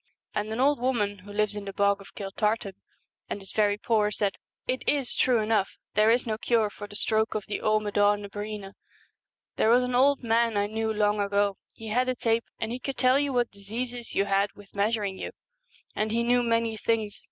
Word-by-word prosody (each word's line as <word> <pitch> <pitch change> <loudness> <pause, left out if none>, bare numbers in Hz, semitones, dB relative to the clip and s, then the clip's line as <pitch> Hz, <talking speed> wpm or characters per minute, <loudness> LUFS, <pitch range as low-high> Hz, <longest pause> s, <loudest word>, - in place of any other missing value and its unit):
' - - -52
And 210 +1 -2
an 220 - -3
old 280 +1 +3
woman 210 -6 0
who 200 +2 -12
lives 210 0 0
in 205 -1 -5
the 195 - -6
Bog 200 0 +2
of 195 - -15
Kiltartan, 210 +1 -1 0.6
and - - -3
is 195 -1 -7
very 205 -1 +2
poor, 215 -1 +2
said, 205 -1 0 0.3
'It 255 +1 -1
is 280 -4 +1
true 250 -2 +3
enough, 215 -2 0 0.2
there 215 +1 +4
is 240 +2 +3
no 220 -2 -2
cure 225 -3 +2
for 205 - -8
the 205 - -12
stroke 220 +1 +1
of 210 - -2
the 205 - -3
Amad&n 205 -1 +2
na - - -5
Breena. 205 -1 -6 0.8
There 220 - +3
was 245 +2 +5
an 250 0 -2
old 270 +2 +4
man 230 -1 +2
I 205 - +2
knew 220 +1 -1
long 210 -1 +1
ago, 200 0 +1
he 225 -1 -9
had 250 +4 +1
a 255 - 0
tape, 230 -1 +1
and 225 - -2
he 245 - -3
could 270 +1 -4
tell 255 +3 +4
what 245 -2 +1
diseases 235 +4 -6
you 200 - +3
had 200 0 +2
with 205 -1 -16
measuring 205 -2 0
you; - - -5 0.6
and 215 0 0
he 235 +1 +1
knew 245 +1 +3
many 230 -1 +1
things. 215 -1 -1
215 Hz, 215 wpm, -27 LUFS, 205-235 Hz, 0.8 s, was